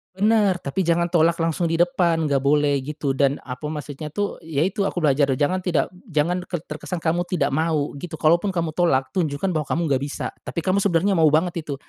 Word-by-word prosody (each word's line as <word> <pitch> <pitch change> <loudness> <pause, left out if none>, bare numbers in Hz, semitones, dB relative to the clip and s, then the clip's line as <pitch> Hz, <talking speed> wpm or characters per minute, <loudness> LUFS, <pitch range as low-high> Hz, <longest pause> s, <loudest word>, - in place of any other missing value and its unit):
Bener, 205 -1 +3
tapi 175 +4 -3
jangan 170 0 +3
tolak 170 -1 +3
langsung 165 +1 0
di 165 - 0
depan, 170 -1 +2
gak 135 -1 +2
boleh 145 0 +2
gitu, 145 0 -3
dan 140 +1 +2
apa, 125 +3 -6
maksudnya 150 0 -6
tuh, 205 +7 -3
yaitu 165 +6 -1
aku - - -6
belajar 140 -1 +3
jangan 180 +6 +1
tidak 180 -3 0 0.2
jangan 170 +3 0
terkesan 170 +1 -5
kamu 170 +1 +1
tidak 155 -7 0
mau 155 -1 0
gitu, 170 +1 -6
kalaupun 170 +6 +3
kamu 170 -4 -1
tolak 145 -7 +1
tunjukkan 175 0 -1
bahwa 155 -3 -2
kamu 170 - 0
nggak 135 -1 +2
bisa, 140 0 -4
tapi 170 - -5
kamu 185 +1 +2
sebenarnya 195 0 +2
mau 165 -4 +4
banget 165 +3 +1
itu. 150 -2 -5
165 Hz, 195 wpm, -23 LUFS, 145-175 Hz, 0.2 s, mau